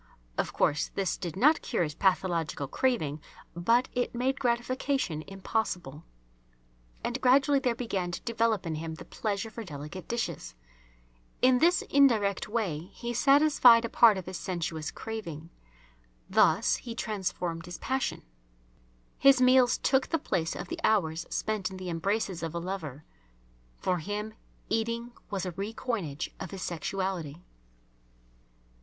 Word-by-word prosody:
Of - - -1
course, 145 - +1
this 195 -2 0
did 175 -4 -5
not 300 +10 +4
cure 230 - 0
his 150 -2 -3
pathological 170 -5 0
craving, 155 - 0 0.3
but 230 +9 +3
it 245 -1 -1
made 260 +3 0
gratification 245 - 0
impossible. 185 -6 -3 1.0
And 250 +2 -2
gradually 275 +2 +5
there 250 -3 0
began 195 -7 -2
to 175 - -5
develop 225 -4 0
in 165 - -2
him 160 +1 -4
the - - -11
pleasure 215 0 -3
for 230 - -6
delicate 150 +1 -8
dishes. 140 - -3 0.9
In 255 0 +6
this 350 +4 +4
indirect 225 -10 +3
way 190 -7 -2
he 240 0 -4
satisfied 275 -3 +6
a - - -3
part 225 -4 +6
of 185 - -5
his 185 -1 -5
sensuous 165 -4 -3
craving. 170 -8 -7 0.8
Thus - - +4
he 235 -2 -7
transformed 180 -6 -3
his 175 - -6
passion. 265 0 -2 1.0
His 275 -1 +6
meals 255 -1 +5
took 265 -1 +2
the 325 - +1
place 180 - -2
of - - -6
the 340 0 -5
hours 170 -7 +1
spent 215 -4 -1
in 190 - -8
the 185 -1 -5
embraces 190 +2 -1
of 165 0 -4
a - - -1
lover. 165 -6 -5 0.7
For 180 -1 0
him 210 +5 -4 0.3
eating 230 +2 -1 0.2
was 195 -2 -2
a 180 - -3
re 200 +5 -5
coinage 180 - -3
of - - -5
his 190 -2 -6
sexuality. 175 -2 -3
200 Hz, 145 wpm, -29 LUFS, 170-240 Hz, 1.0 s, In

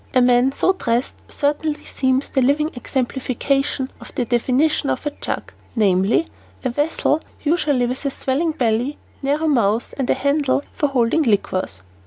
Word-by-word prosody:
A - - +7
man 245 +1 +4
so 370 +7 +2
dressed 240 -8 -2
certainly 295 +1 -1
seems 260 0 0
the 265 - +1
living 295 +5 +2
exemplification 265 +2 -1
of - - -10
the 250 - 0
definition 260 +6 +1
of - - -2
a 295 - 0
jug, - - -5 0.2
namely, 200 - +3 0.4
"a - - +2
vessel 295 +3 +1 0.2
usually 295 -5 +2
with 250 +4 -3
a - - +2
swelling 280 +5 -1
belly, 245 +1 0 0.2
narrow 290 +3 0
mouth, 230 -6 +2
and 265 - -1
a - - +4
handle, 280 -1 +1
for 295 - +1
holding 260 +2 +2
liquors." 185 - 0
265 Hz, 155 wpm, -21 LUFS, 240-295 Hz, 0.4 s, A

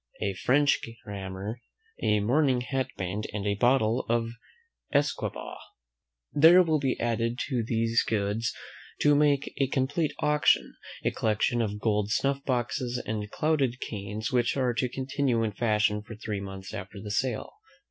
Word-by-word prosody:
A 100 - -1
French 140 +9 +3 0.3
grammar. 100 +3 -6 0.4
A 105 0 +3
mourning 130 +3 +2
hat 130 +1 -1
band; 95 +3 -3
and 105 -1 -3
half 100 0 +1
a - - -15
bottle 120 -2 +3
of 115 0 +1 0.6
usquebaugh. 145 0 -1 0.7
There 165 +5 +8
will 160 -3 +1
be 135 -2 -1
added 115 0 0
to 125 -4 0
these 115 +1 +1
goods, 105 +1 -1 0.5
to 145 - +5
make 145 -1 +2
a 135 - +3
complete 140 +4 0
auction, 150 0 +2 0.3
a - - +3
collection 110 +2 +1
of 105 -2 -2
gold 105 -2 +1
snuff 140 +5 0
boxes 125 -1 -1
and 105 -1 -3
clouded 140 -3 0
canes, 105 +1 -4
which 120 +1 +1
are 125 -2 +1
to 125 +2 0
continue 130 -2 0
in 110 - 0
fashion 105 -1 +1
for 110 +1 -10
three 105 -1 -4
months 95 -1 -8
after 95 +2 -7
the 105 +1 -6
sale. 120 +1 -1
115 Hz, 155 wpm, -28 LUFS, 105-135 Hz, 0.7 s, There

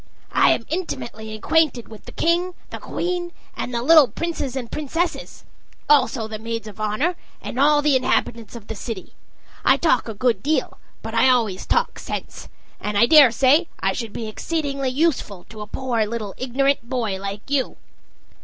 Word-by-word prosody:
I - - +4
am 230 - +1
intimately 235 -10 -5
acquainted 270 +1 +1
with 220 -1 -13
the - - -9
king, 350 +2 0 0.2
the - - -6
queen, 350 0 -3 0.2
and - - -4
the 235 -1 -2
little 310 -1 +7
princes 305 -4 -4
and 245 -3 -5
princesses 330 +4 -3 0.4
also 260 -5 +3
the 215 -1 -6
maids 230 0 -4
of 210 -1 -11
honor, 215 +12 0 0.2
and 250 - -6
all 295 +1 +4
the 295 -2 +4
inhabitants 235 -3 0
of 230 -3 -9
the 220 - -6
city. 220 -2 -7 0.5
I - - +5
talk 330 - +2
a 220 - -5
good 230 -2 +1
deal, 305 +5 -1 0.2
but 225 - -6
I 230 +3 +4
always 225 -7 +1
talk 475 0 0
sense, - - -6 0.3
and 210 0 -3
I 220 - +6
daresay 280 +3 +6
I 195 - +1
should 230 -1 -5
be 220 +1 -5
exceedingly 275 +2 -2
useful 255 - 0
to 215 0 -9
a 210 - -6
poor 240 -1 -1
little 215 -3 -4
ignorant 260 -1 0
boy 225 -7 -2
like 200 +1 -6
you." 275 -2 0
250 Hz, 170 wpm, -22 LUFS, 220-300 Hz, 0.5 s, little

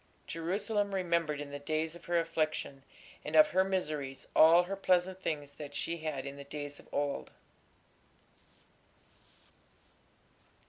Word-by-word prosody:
Jerusalem 200 +4 -1
remembered 170 -5 0
in 145 -1 -6
the 145 - -5
days 155 +2 -1
of 170 - -13
her 175 0 +1
affliction 155 -4 -1 0.4
and 155 - -4
of 155 - +8
her 190 +1 +3
miseries 150 -8 -3
all 165 +3 +8
her 190 +2 -4
pleasant 185 -1 +1
things 145 -5 -3
that 145 0 -9
she 170 +3 -2
had 155 -4 -4
in 140 0 -6
the 140 - -7
days 145 0 -6
of - - -17
old.... 145 -1 -1
155 Hz, 135 wpm, -32 LUFS, 145-180 Hz, 0.4 s, of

